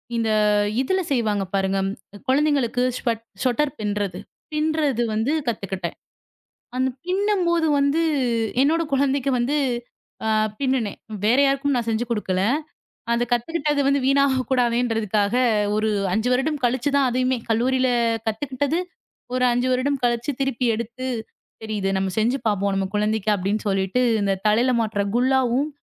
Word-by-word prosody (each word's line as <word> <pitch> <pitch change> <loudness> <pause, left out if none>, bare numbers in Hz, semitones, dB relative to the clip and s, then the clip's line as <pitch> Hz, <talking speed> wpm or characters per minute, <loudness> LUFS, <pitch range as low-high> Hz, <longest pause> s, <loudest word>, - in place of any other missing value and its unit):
இந்த 225 -1 0 0.5
இதுல 375 +8 0
செய்வாங்க 215 -6 +1
பாருங்க. 195 0 +1 0.5
குழந்தைகளுக்கு 270 -3 +2 0.2
ஸ்வ் 240 - -2 0.3
ஸ்வட்டர் 275 +3 +1
பிண்றது. 205 -3 -2 0.3
பிண்றது 305 -5 +1
வந்து 220 +6 0 0.2
கத்துக்கிட்டேன். 190 -6 -3 0.8
அந்தப் 260 0 -1
பின்னும்போது 365 -4 +1
வந்து 280 +4 +2 0.6
என்னோட 325 +4 +2
குழந்தைக்கு 275 0 +1
வந்து 260 +5 0 0.7
ஆ - - +1 0.3
பின்னுனேன். 260 -6 -1 0.3
வேற 235 +5 +4
யாருக்கும் 275 0 +1
நான் 235 -2 -1
செஞ்சு 225 +2 0
கொடுக்கல. 190 -5 -1 0.7
அதைக் 240 +1 0
கத்துக்கிட்டது 285 +1 +1
வீணாகக் 275 -2 +2
கூடாதுன்றதுக்காக 230 -4 +1 0.4
ஒரு 215 +1 +1 0.2
5 220 +4 0
வருடம் 285 +3 0
கழிச்சு 250 +3 +1
தான் 270 -2 +3
அதையுமே 255 +1 +1
கல்லூரியில 255 +3 +2 0.4
கத்துக்கிட்டது. 270 +7 -1 0.6
ஒரு 255 0 +1
5 245 +1 +1
வருடம் 270 +2 0
கழிச்சு 240 +4 +1
திருப்பி 260 -2 0
எடுத்து 235 +3 -5 0.6
தெரியுது. 210 -3 -2
நம்ம 190 0 -1
செஞ்சு 240 +5 +2
பாப்போம் 200 -1 +1
நம்ம 195 0 0
குழந்தைக்கு 215 0 0
அப்படின்னு 200 +3 -1
சொல்லிட்டு 195 +5 0 0.2
இந்தத் 195 -1 -1
தலையில 240 +4 +3
மாட்டுற 205 -2 -1
குல்லாவும், 260 +2 +2
245 Hz, 125 wpm, -23 LUFS, 215-275 Hz, 0.8 s, வேற